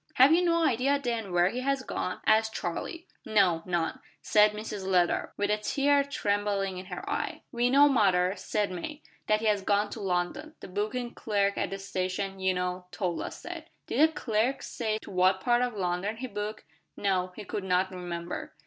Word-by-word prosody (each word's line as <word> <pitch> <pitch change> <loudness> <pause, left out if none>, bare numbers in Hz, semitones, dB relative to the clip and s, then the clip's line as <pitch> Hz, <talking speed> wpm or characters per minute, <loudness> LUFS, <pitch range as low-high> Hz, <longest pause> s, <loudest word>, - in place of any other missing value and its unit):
"Have 265 +5 +7
you 350 +2 +4
no 335 -1 +3
idea, 270 +1 +2
then, 235 -7 -3
where 175 +1 +4
he 240 +5 -4
has 275 +1 0
gone?" 185 -7 -3
asked 220 0 +3
Charlie. 330 - -4 0.2
"No, 195 -7 +3
none," 170 -2 -1 0.2
said 210 0 +5
Mrs 210 -2 -5
Leather, 180 -2 +1
with 205 0 +1
a 210 - +3
tear 280 +6 +2
trembling 200 -7 -1
in 185 - -9
her 395 - -7
eye. 415 - -3
"We 240 +1 +1
know, 280 +3 +7
mother," 190 -8 +3
said 205 -2 -1
May, 290 - -6 0.2
"that 215 0 +3
he - - -3
has 210 -2 +3
gone 205 +1 +1
to - - -6
London. 195 - -2
The - - -10
booking 235 +6 -2
clerk 200 -2 0
at - - -1
the 195 - -4
station, 195 0 -3
you 190 -1 +1
know, 180 0 -3
told 180 -4 -2
us - - -7
that." 340 -2 -7 0.2
"Did 305 +6 +4
the - - -11
clerk 240 +2 0
say 220 -2 -2
to - - -10
what 185 +1 +3
part 240 +4 +2
of 245 -3 -1
London 180 +3 -1
he 255 - -4
booked?" 210 -2 -5 0.3
"No, 185 -2 0
he 215 - -7
could 200 0 -4
not 185 0 +1
remember." 175 -1 -5
205 Hz, 195 wpm, -29 LUFS, 185-245 Hz, 0.3 s, Have